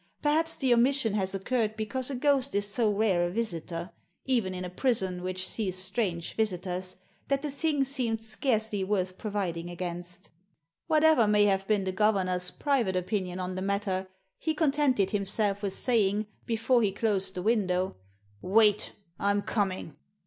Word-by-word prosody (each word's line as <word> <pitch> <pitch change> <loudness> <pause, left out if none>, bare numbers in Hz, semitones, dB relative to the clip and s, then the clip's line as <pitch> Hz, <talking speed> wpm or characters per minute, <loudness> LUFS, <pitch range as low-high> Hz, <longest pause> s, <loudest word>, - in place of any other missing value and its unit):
Perhaps 315 +2 +2
the 260 -3 +2
omission 240 -2 +3
has 195 -2 +1
occurred 220 +2 -1
because 245 +5 0
a 275 - -3
ghost 275 -1 +1
is 205 0 +1
so 220 +1 +1
rare 200 -4 +2
a 175 - 0
visitor 175 -4 -4 0.2
— - - -48
even 190 -6 -1
in 180 0 -4
a - - -5
prison, 190 -5 0
which 185 +1 -2
sees 190 -4 -2
strange 185 -3 -2
visitors 185 -3 -2 0.2
— - - -37
that 275 0 0
the 295 - -2
thing 290 0 +1
seemed 250 -5 -1
scarcely 220 -2 0
worth 185 -2 -1
providing 180 -5 -3
against 175 +1 -6 0.6
Whatever 315 -7 +4
may 210 0 +4
have 195 -1 +1
been 210 -2 +2
the 190 - -1
governor's 185 -3 +1
private 255 -9 0
opinion 185 0 -2
on 185 0 -3
the 185 - -4
matter, 195 -1 -1 0.3
he 315 -1 -1
contented 275 - +2
himself 200 0 +1
with 200 -2 -2
saying, 215 -4 +2 0.2
before 235 +2 +2
he 205 -3 +2
closed 195 -2 0
the 180 - -4
window 190 - +1 0.3
— 100 0 -34 0.2
"Wait!— 210 -1 +4 0.3
I'm 200 0 +1
coming!" 190 -8 -2
205 Hz, 165 wpm, -28 LUFS, 185-235 Hz, 0.6 s, Whatever